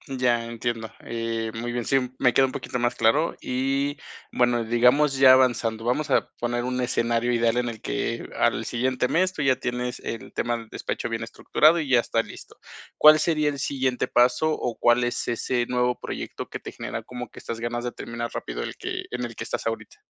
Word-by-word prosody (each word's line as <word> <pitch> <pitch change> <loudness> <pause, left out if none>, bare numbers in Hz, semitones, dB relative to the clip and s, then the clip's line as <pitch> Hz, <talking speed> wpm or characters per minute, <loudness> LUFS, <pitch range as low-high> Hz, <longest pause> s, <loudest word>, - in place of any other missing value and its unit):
Ya, 120 -2 +1
entiendo, 115 -1 -3
eh, 115 -1 -3
muy 120 +1 -4
bien. 120 - -2
Sí, 135 - +2 0.2
me 125 -2 +3
queda 135 - +5
un 130 - -3
poquito 125 - -4
más 120 0 0
claro. 140 +9 +2
Y, 135 +3 -1 0.3
bueno, 120 -1 +2
digamos 125 +5 +3
ya 130 -1 +8
avanzando, 115 -4 +2
vamos 125 +6 0
a - - +2
poner 120 0 -1
un 125 0 -2
escenario 120 -1 +1
ideal 115 0 +2
en 125 0 +1
el 115 -2 -6
que - - -2
al - - +2
siguiente 125 +1 0
mes, 185 +2 +2
tú - - -4
ya 135 -2 +3
tienes 125 0 -3
el 115 - -6
tema 120 0 -1
del 115 -1 -11
despacho - - -4
bien 115 -1 -3
estructurado 155 +7 +3
y 150 -4 -3
ya 125 -2 +5
está 115 -1 +1
listo, - - -12 0.4
¿cuál 155 0 +8
sería 155 -2 +2
el 140 - -5
siguiente 130 -2 -1
paso, 125 +6 +3
o 120 -5 -3
cuál 120 +1 +4
es 120 0 -2
ese 120 +1 0
nuevo 125 0 0
proyecto - - -6
que - - -6
te - - -8
genera - - -6
como 125 0 -7
que - - -12
estas 115 -1 -6
ganas 120 +1 -3
de 120 - -2
terminar 120 0 -5
rápido - - -4
el - - -6
que - - -4
en 125 0 -3
el 115 -1 -8
que - - -5
estás - - -3
ahorita? 110 -2 -5
120 Hz, 210 wpm, -25 LUFS, 115-130 Hz, 0.4 s, ya